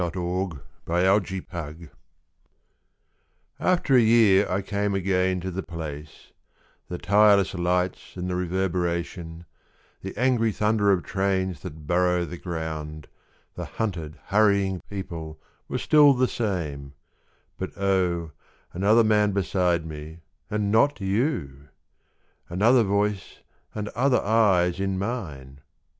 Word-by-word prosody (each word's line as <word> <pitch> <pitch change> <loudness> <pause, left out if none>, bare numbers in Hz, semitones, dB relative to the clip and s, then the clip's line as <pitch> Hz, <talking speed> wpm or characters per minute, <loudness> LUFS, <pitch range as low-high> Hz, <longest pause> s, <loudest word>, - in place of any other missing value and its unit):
IN 90 - 0
A 85 - -6
SUBWAY 90 +2 -1
STATION 80 -1 -8 1.7
AFTER 175 -7 +2
a - - +7
year 110 -4 +5
I 95 +2 -1
came 100 0 -1
again 95 -1 +1
to 95 +1 -4
the 95 +2 -3
place; 75 -4 -8 0.6
The 90 - -4
tireless 100 +2 +4
lights 90 +1 -2
and 90 0 -3
the 90 - -2
reverberation, 85 -2 -2 0.6
The 95 +1 -7
angry 120 -2 +2
thunder 105 -1 +2
of 95 -3 +1
trains 95 -2 -1
that 80 -4 -9
burrow 90 +1 +2
the 85 0 -8
ground, 80 -3 -5 0.4
The - - -6
hunted, 85 -9 -4
hurrying 100 -2 +2
people 85 -6 -7 0.3
were - - -3
still 145 -2 +5
the 130 +1 +2
same 75 - -3 0.7
But - - -6
oh, 90 -4 0 0.4
another 105 +6 +4
man 105 -2 +3
beside 90 -3 0
me 80 +1 -9 0.3
and 105 -1 -1
not 140 +5 +3
you! 95 - -2 0.8
Another 110 +8 +4
voice 100 -2 -1 0.3
and 105 -1 -3
other 130 +2 +1
eyes 95 -5 +3
in 95 -1 -1
mine! 75 - -5
95 Hz, 120 wpm, -25 LUFS, 85-105 Hz, 1.7 s, a